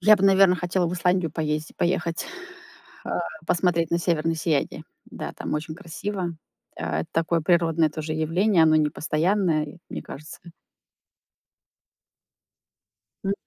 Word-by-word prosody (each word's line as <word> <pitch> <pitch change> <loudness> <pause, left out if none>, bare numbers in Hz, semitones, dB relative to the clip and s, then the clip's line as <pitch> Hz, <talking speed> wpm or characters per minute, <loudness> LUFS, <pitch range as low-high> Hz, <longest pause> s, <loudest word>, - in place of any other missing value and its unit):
Я 210 +3 +7
бы, 195 - 0
наверное, 195 -1 +6
хотела 180 +1 0
в 170 - -2
Исландию 180 -2 +1
поезди 155 0 -2
поехать, 170 -1 0 0.8
а, - - -2 0.3
посмотреть 170 -1 +2
на 170 - +2
северное 165 -1 +1
сияние. 155 -3 -1 0.2
Да, - - -6
там - - -4
очень 155 +1 -3
красиво. 175 0 -4 0.4
Это 80 +1 -2
такое 165 0 +1
природное 165 -1 +3
тоже 155 0 -4
явление. 165 +4 +3
Оно 155 -1 +5
непостоянное, 155 +3 +1
и 150 +4 -11
мне - - -5
кажется 150 +3 -10 2.9
М. 195 - +1
165 Hz, 125 wpm, -25 LUFS, 155-180 Hz, 2.9 s, Я